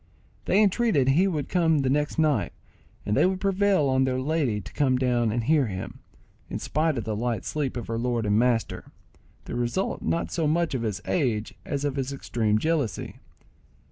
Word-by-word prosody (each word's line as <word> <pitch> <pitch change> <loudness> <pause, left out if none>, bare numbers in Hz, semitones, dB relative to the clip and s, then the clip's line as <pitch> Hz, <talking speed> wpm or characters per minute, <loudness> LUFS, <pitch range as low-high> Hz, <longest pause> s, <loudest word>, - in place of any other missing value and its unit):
They 210 - +4
entreated 200 - +2
he 170 +8 +4
would 150 -7 -2
come 160 -4 +2
the 130 - +1
next 150 +3 0
night, 145 - +1 0.5
and 105 - 0
they - - +4
would 190 0 -1
prevail 195 -5 +2
on 130 0 +2
their 130 -1 0
lady 135 -6 0
to 95 - -11
come 130 -3 +2
down 120 -3 +1
and 120 +1 -1
hear 145 0 +3
him, 95 -2 -6 0.5
in - - -3
spite 155 -1 0
of 115 - -2
the 110 -2 -3
light 115 -2 -2
sleep 140 -5 -2
of 120 - -4
her 115 0 -3
lord 120 -2 -1
and 105 +1 +2
master—the 120 -2 -4
result 120 +11 -1
not 170 - -1
so 165 -3 0
much 165 +1 +1
of 130 - -1
his 105 -5 -3
age 120 -10 -1
as 145 0 -2
of 140 -1 -2
his 135 0 -2
extreme 115 -6 0
jealousy. 145 - -2
135 Hz, 190 wpm, -26 LUFS, 115-160 Hz, 0.5 s, They